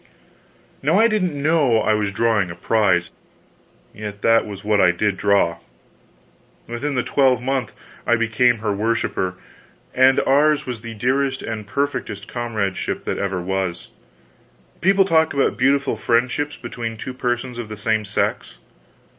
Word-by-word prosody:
Now - - +2
I 225 - +6
didn't 185 -9 -1
know 145 -5 +3
I 110 - +2
was 105 -2 0
drawing 110 -3 +1
a 85 - -7
prize, 90 -3 +1 0.8
yet 105 -1 -8
that 115 -1 +4
was 100 -2 -8
what 105 -1 +2
I 90 - +6
did 95 +3 0
draw. 95 -3 +2 1.1
Within 135 +5 -3
the 125 - +1
twelvemonth 130 -2 +1 0.4
I 120 - +4
became 115 +1 +2
her 105 - +1
worshiper; 105 -3 -1 0.6
and 130 +1 +5
ours 145 +2 +3
was 125 -4 -5
the 115 -1 -8
dearest 130 +4 0
and 110 -2 -5
perfectest 115 -6 -3
comradeship 110 -6 -3
that - - -3
ever 100 -2 -2
was. 90 -1 -3 0.9
People 195 +1 +4
talk 160 -4 +2
about 140 - +1
beautiful 140 +2 +2
friendships 130 +5 0
between 115 -2 -6
two 130 - -6
persons 120 0 -3
of 115 -2 -6
the 110 - -7
same 110 +1 0
sex. 100 -10 -2
115 Hz, 145 wpm, -21 LUFS, 105-135 Hz, 1.1 s, I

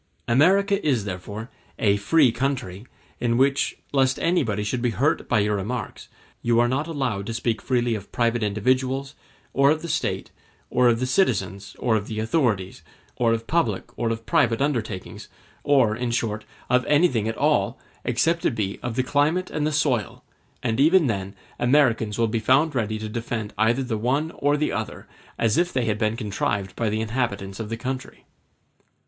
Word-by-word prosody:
America 195 - +3
is 130 -9 +1
therefore 105 +4 -6 0.3
a 100 -2 +3
free 120 +7 +4
country, 120 -5 -3 0.3
in 120 -1 +1
which, 135 +2 +2 0.2
lest 130 -1 +3
anybody 130 - +1
should 120 +4 -2
be 120 - +1
hurt 120 +7 0
by 120 - +3
your 105 0 +2
remarks, 105 +3 -5 0.3
you 115 0 +2
are 120 - +4
not 135 +5 -1
allowed 125 -11 -2
to 115 - -3
speak 115 -1 -1
freely 120 -2 +1
of 100 -3 -6
private 120 0 +1
individuals, 130 +6 0 0.4
or 140 0 +4
of 155 +2 +1
the - - -4
State, - - -2 0.4
of 120 -2 +3
the 130 - 0
citizens 100 - 0
or 120 -3 +1
of 105 -1 -2
the 110 -1 -4
authorities, 110 - 0 0.4
of 115 -1 +1
public 115 - -1
or 115 - -1
of 115 0 -4
private 115 -1 +2
undertakings, 120 -9 -3 0.4
or, 130 -7 +3
in 120 +1 -2
short, 110 -2 -2 0.2
of 125 0 +3
anything 145 -8 +3
at 115 - -3
all, - - +1 0.3
except 165 +1 +1
it 120 - +1
be 100 -3 -2
of 120 -2 -4
the 130 - +1
climate 150 +7 +1
and 150 -1 0
the - - -1
soil; 130 - 0 0.4
and 115 -1 0
even 165 +4 +5
then 100 -4 -2 0.2
Americans 120 -5 +2
will 115 -1 +2
be 110 +1 -1
found 135 +8 +3
ready 110 -4 -1
to 110 0 -5
defend 110 -1 -4
either 120 +4 +2
the 115 -4 -2
one 140 +8 0
or 145 +1 +1
the 150 - 0
other, - - -4 0.3
as 115 +3 +2
if 175 +1 +1
they 125 -2 0
had 105 -1 -1
been 110 0 0
contrived 100 -3 -2
by 115 -2 0
the 110 +1 -1
inhabitants 105 -4 -2
of 110 -2 -5
the 115 - -3
country. 130 +2 -6
120 Hz, 180 wpm, -24 LUFS, 110-135 Hz, 0.4 s, even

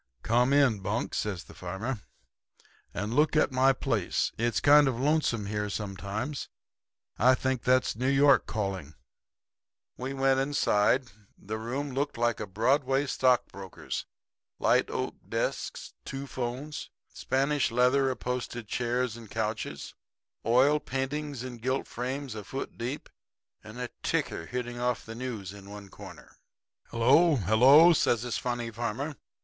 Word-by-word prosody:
"'Come 120 +3 +3
in, 140 -7 +4
Bunk,' 95 - -2
says 100 -5 -2
the - - -15
farmer, 100 +7 -4 0.9
'and 105 +2 -3
look 150 +4 +3
at 155 - +3
my 130 +1 +4
place. 135 - -1
It's 120 +1 0
kind 145 0 +6
of 125 -3 -1
lonesome 140 -6 +1
here 105 0 -2
sometimes. 105 +7 -4 0.7
I 130 +3 +6
think 130 -1 -1
that's 130 -2 +2
New 130 +4 0
York 140 0 +5
calling.' 95 -8 -3 1.0
"We 130 +2 -4
went 135 0 +3
inside. 130 -3 +2 0.3
The 110 +2 -5
room 135 +6 -3
looked 140 0 -2
like 120 -1 +1
a 105 - -4
Broadway 135 +7 +1
stockbroker's 125 -8 -1 0.5
light - - +2
oak - - -3
desks, - - -3
two 135 0 -6
'phones, 130 +3 -5 0.2
Spanish 140 +2 0
leather 125 +3 +3
upholstered 125 -2 -4
chairs 120 0 -1
and 115 -3 -11
couches, 110 0 -4 0.5
oil 130 +6 +4
paintings 135 0 -3
in 125 -2 -7
gilt 130 +4 -1
frames 130 +1 -4
a 105 -1 -6
foot 135 +6 -6
deep 125 +5 -5 0.6
and 110 +3 -10
a 125 -1 -4
ticker 80 - -1
hitting 120 -1 -4
off 125 -1 -1
the 115 - -7
news 115 -6 -5
in 100 -1 -12
one 100 -1 -10
corner. - - -13 0.5
"'Hello, 140 +8 +4
hello!' 130 - +7
says 120 -6 +2
this 120 -2 -2
funny 120 -2 -3
farmer. 120 +6 -3
125 Hz, 140 wpm, -29 LUFS, 110-135 Hz, 1.0 s, hello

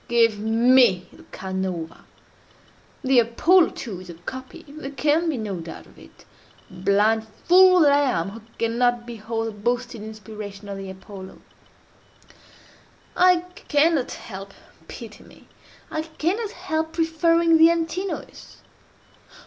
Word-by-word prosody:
Give 230 -3 +3
me 225 -3 +4
the - - -16
Canova! 185 -3 -5 1.0
The 260 -2 +4
Apollo, 320 +10 +4
too, 195 -7 -6
is 185 - -13
a 170 - -8
copy—there 260 - -9
can 300 +5 +1
be 295 - -1
no 205 -5 -4
doubt 165 0 -9
of - - -19
it—blind 205 +3 -2 0.2
fool 365 0 +7
that 290 -2 +6
I 280 -10 +2
am, 170 +3 -3
who 225 +2 -10 0.2
cannot 240 +1 +1
behold 225 -1 -4
the - - -4
boasted 240 +2 -3
inspiration 210 -2 -9
of 195 -1 -5
the 195 -1 -7
Apollo! 190 0 -10 1.8
I 360 -1 +5 0.3
cannot 295 -2 +2
help—pity 195 -1 -11
me!—I 310 - -10
cannot 340 +7 -2
help 320 -6 -3
preferring 330 0 +3
the 325 +1 +8
Antinous. 335 +3 -4
240 Hz, 115 wpm, -23 LUFS, 205-315 Hz, 1.8 s, the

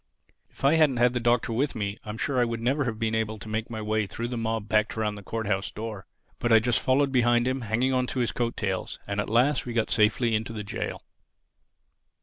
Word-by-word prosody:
If - - -6
I 140 - +6
hadn't 150 -5 +4
had 120 +1 +4
the 125 - 0
Doctor 120 -1 +1
with 135 +5 0
me 100 -1 -3
I 105 - -9
am 105 - -5
sure 140 +1 0
I - - +5
would 115 -1 -2
never 135 +5 +1
have 115 -3 -2
been 110 0 -1
able 110 -1 -1
to 110 - -10
make 110 +1 -3
my 110 -2 -5
way 110 -1 0
through 115 +4 -4
the 125 - -3
mob 110 -2 -2
packed 110 0 +1
around 105 -1 0
the 100 - -9
Court 110 +3 -4
house 100 -1 -1
door. 110 -3 -7 0.3
But 120 - 0
I 115 - +8
just 115 +2 +2
followed 135 +1 +2
behind 120 -1 +3
him, 130 0 -1
hanging 120 +4 0
on 125 -1 +1
to 130 - -3
his 120 - +1
coat 120 -1 -2
tails; 95 -3 -2
and 100 0 -3
at - - -5
last 125 +5 +2
we 120 - -3
got 115 -2 0
safely 115 +2 +3
into 110 +1 -1
the 105 -2 -5
jail. 105 - -5
115 Hz, 250 wpm, -27 LUFS, 110-125 Hz, 0.3 s, I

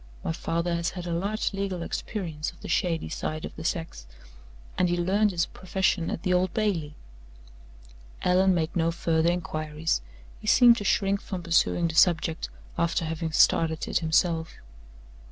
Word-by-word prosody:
My - - -1
father 170 +1 -2
has 170 +1 0
had 180 -2 -7
a 170 - -2
large 200 +6 -1
legal 195 -3 -3
experience 165 -6 -4
of - - -16
the - - -7
shady 165 -3 0
side 155 0 -4
of - - -9
the 160 - -8
sex, 160 - -4 0.7
and 180 -1 +2
he 175 - 0
learned 195 +5 +2
his 175 -4 0
profession 185 -2 -1
at - - -4
the 185 - +1
Old 180 0 +2
Bailey." 175 -9 -1 1.3
Allan 185 +1 +4
made 160 -1 -1
no 165 -1 +2
further 165 -1 +1
inquiries. 155 - -2 0.4
He - - -10
seemed 240 0 +7
to 205 - -4
shrink 195 0 +1
from 185 -3 -6
pursuing 170 0 +2
the 160 - -4
subject, 165 - +2 0.3
after 170 0 +1
having 160 0 -3
started 160 0 +3
it - - +1
himself. 165 0 +1
170 Hz, 165 wpm, -27 LUFS, 160-185 Hz, 1.3 s, seemed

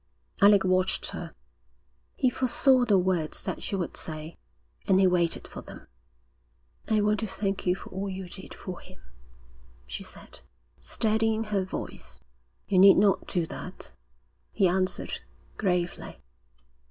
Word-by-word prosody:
Alec 200 -1 +7
watched 185 0 +1
her. - - -7 0.8
He 255 -2 +2
foresaw 260 0 +3
the 205 -4 +4
words 180 -4 0
that - - -4
she - - -2
would 180 -3 -3
say, 155 +1 -5 0.5
and 190 -1 +5
he 195 - +5
waited 175 -2 +1
for - - -8
them. - - -12 1.0
'I 215 -1 +2
want 210 0 +2
to 220 - -2
thank 195 -1 -3
you 180 - +3
for - - -11
all 195 +1 -3
you 190 -1 -6
did 190 +2 -10
for 180 -2 -7
him,' - - -16 0.8
she - - -6
said, - - -10 0.4
steadying 220 - +1
her 205 -3 -1
voice. 185 - -7 0.5
'You 185 - +3
need 195 +1 +8
not 200 0 +3
do 175 -4 0
that,' - - -9 0.6
he 195 - +3
answered, 185 +1 -1 0.4
gravely. 180 -3 -2
190 Hz, 140 wpm, -27 LUFS, 180-210 Hz, 1.0 s, need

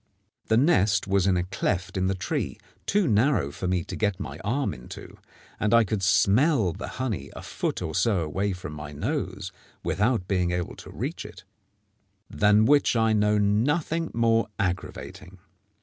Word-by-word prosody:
The 110 - +3
nest 100 - +3
was 100 -1 +2
in 95 -2 +3
a 90 - +1
cleft 95 0 -2
in 95 -1 +1
the 95 - 0
tree 95 - -3 0.3
too 200 -3 +2
narrow 110 - +2
for 90 - -4
me 90 -1 0
to - - -7
get 105 -3 -1
my - - -6
arm 135 +6 -1
into, - - -11 0.4
and 105 +2 +3
I 115 - +6
could 105 -1 -2
smell 100 - +3
the 95 - -6
honey 130 -7 -3
a - - -8
foot - - -3
or - - -4
so 105 -6 +2
away 95 +6 -1
from 90 -4 -7
my 75 0 -8
nose 95 - -3 0.3
without 105 -2 0
being 90 -2 +1
able 90 0 -3
to - - -11
reach - - -4
it - - -11 0.9
than 105 +1 +4
which 145 0 +4
I 115 -1 +3
know 105 0 +3
nothing 145 +11 +1
more 115 0 +2
aggravating. 95 -1 -4
100 Hz, 170 wpm, -26 LUFS, 95-115 Hz, 0.9 s, I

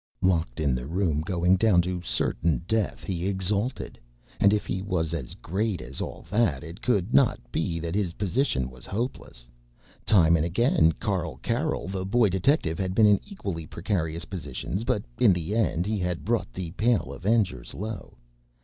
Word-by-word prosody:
Locked 80 -9 +1
in 70 -4 +2
the 60 +1 -3
room, 80 -3 0
going 90 +2 +2
down 95 -4 +4
to 90 0 -3
certain 80 -4 0
death, 110 -1 -1
he 90 -1 -2
exulted. 100 +5 -1 0.4
And 100 - +5
if 105 0 +1
he 95 - -2
was 90 -5 -1
as 70 -7 -4
great 100 +1 -2
as 65 +1 -6
all - - -6
that, 100 - +2
it 85 +7 -9
could 105 -2 0
not 135 -4 +4
be 85 +4 -1
that 85 0 -4
his 95 -4 0
position 95 - 0
was 65 -1 -12
hopeless. 110 - -4 0.6
Time 85 -5 +5
and 80 - +2
again 85 - +3
Carl 90 - -2
Carroll, 125 - -1
the 95 0 -3
Boy 110 +3 +3
Detective, 95 - +1
had 95 -1 -1
been 110 - +6
in 105 -1 +5
equally 95 - -5
precarious 85 -3 -2
positions, 85 - -4
but 120 -4 0 0.2
in 110 -6 +6
the 85 +2 -3
end 90 -6 +1
he 105 0 -1
had 90 -2 -2
brought 115 +2 0
the 90 -3 -5
Pale 105 - +1
Avengers 90 - 0
low. 105 -2 -6
95 Hz, 175 wpm, -26 LUFS, 80-105 Hz, 0.6 s, been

